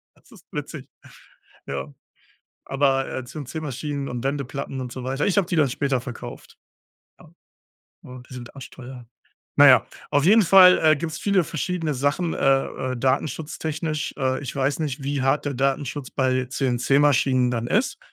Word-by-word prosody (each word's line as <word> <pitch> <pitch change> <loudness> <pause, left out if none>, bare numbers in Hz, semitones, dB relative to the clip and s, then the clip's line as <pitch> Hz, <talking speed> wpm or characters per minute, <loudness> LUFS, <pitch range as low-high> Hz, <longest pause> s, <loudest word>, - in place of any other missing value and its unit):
Das - - -26
ist - - -17
witzig. - - -6 0.8
Ja, 70 +1 -5 0.7
aber, 135 -1 +1
äh, 130 - -4
CNC-Maschinen 145 +1 -5
und 120 0 -5
Wendeplatten 140 -1 -3
und 125 -1 -6
so 130 +1 -7
weiter 135 +3 -1
ich 200 - 0
habe 185 -3 +3
die 180 - -1
dann 150 -4 +3
später 135 -1 -1
verkauft. 120 -1 -9 0.6
Ja. 170 - -17 0.7
Ja, 125 -1 -10
die - - -11
sind 120 0 -9
arschteuer. 130 -2 -10 0.5
Na - - +8
ja, - - +6 0.2
auf 145 +1 +2
jeden 215 +5 +6
Fall, 185 0 +7
äh, 155 -1 +5
gibt 160 +1 -4
es - - -5
viele 200 -3 +2
verschiedene 165 0 -2
Sachen, 145 +6 0
äh, 135 -1 0
äh, 130 - -4
Datenschutztechnisch. 150 +4 -2
Äh, 130 -1 -1
ich 135 - -6
weiß 140 +1 0
nicht, 145 -2 -3
wie 140 0 -2
hart 135 +2 +1
der 145 - -2
Datenschutz 135 +1 -2
bei 130 -1 0
CNC-Maschinen 130 0 +2
dann 120 -1 -2
ist, 215 - 0
135 Hz, 160 wpm, -23 LUFS, 130-150 Hz, 0.8 s, Na